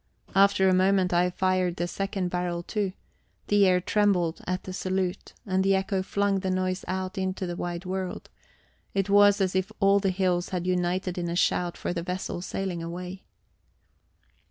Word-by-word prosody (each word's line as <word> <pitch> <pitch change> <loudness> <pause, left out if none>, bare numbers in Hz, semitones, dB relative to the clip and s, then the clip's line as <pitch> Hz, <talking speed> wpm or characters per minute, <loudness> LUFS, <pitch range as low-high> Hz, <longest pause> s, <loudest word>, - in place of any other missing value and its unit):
After 195 -1 +5
a 185 - +4
moment 185 0 +3
I 175 +1 +3
fired 185 -1 0
the 175 - -2
second 195 0 -2
barrel 175 -1 -2
too; 200 -1 -2 0.6
the 205 -1 +5
air 180 -1 +4
trembled 180 -4 +1
at 185 +1 -2
the 185 - -7
salute, 185 0 -2
and 190 -2 +1
the 195 0 +3
echo 190 0 0
flung 200 +1 0
the 190 0 -2
noise 185 0 -1
out 185 0 -3
into 190 0 -2
the 175 -1 -4
wide 175 +1 -4
world; 185 0 -4 0.7
it 195 0 0
was 205 0 +6
as 190 -1 0
if 190 +3 0
all 200 0 +5
the 195 -1 +1
hills 180 -2 0
had 180 -2 -3
united 180 0 0
in 170 -1 -2
a 170 - -2
shout 175 0 +1
for - - -3
the 170 - -2
vessel 180 0 -4
sailing 185 -2 -3
away. 180 +3 -6
185 Hz, 180 wpm, -27 LUFS, 180-195 Hz, 0.7 s, was